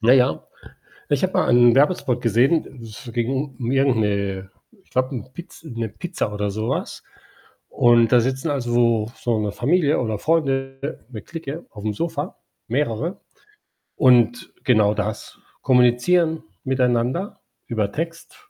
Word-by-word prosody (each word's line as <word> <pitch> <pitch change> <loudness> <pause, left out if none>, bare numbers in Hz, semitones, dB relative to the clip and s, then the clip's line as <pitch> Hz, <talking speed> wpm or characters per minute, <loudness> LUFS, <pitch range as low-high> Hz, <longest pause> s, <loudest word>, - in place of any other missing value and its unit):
Na 115 +2 +5
ja, 125 -11 +3 0.6
ich - - +1
habe - - +1
mal - - +2
einen 120 -1 +6
Werbespot 135 -3 +2
gesehen, 125 +4 +1
es 110 +2 -10
ging 130 +4 -2
um 120 -1 -3
irgend 135 -1 +3
'ne, 100 -2 -1 0.3
ich - - -33
glaube, 130 +1 0
'n 125 +1 -7
Piz 175 +4 -11
'ne 115 -6 -4
Pizza 110 - -4
oder 105 0 -2
so 110 +3 -3
was - - -3 0.7
und 120 -1 +4
da 125 - +7
sitzen 130 +5 -1
also 130 -4 -2
so 115 -2 +2
so 115 -2 -1
'ne 105 -1 -1
Familie 145 - +2
oder 110 -4 -2
Freunde 135 -2 -1
'ne 110 -5 -8
Clique 160 +2 -7
aufm 105 -1 -4
Sofa 165 - -3 0.3
mehrere 135 - -1 0.8
und 120 -3 +3
genau 110 -6 +4
das, 110 +1 -5 0.2
kommunizieren 135 +7 +3 0.2
miteinander 130 - 0 0.3
über 105 -3 -1
Text, 165 - -7
125 Hz, 145 wpm, -22 LUFS, 115-140 Hz, 0.8 s, da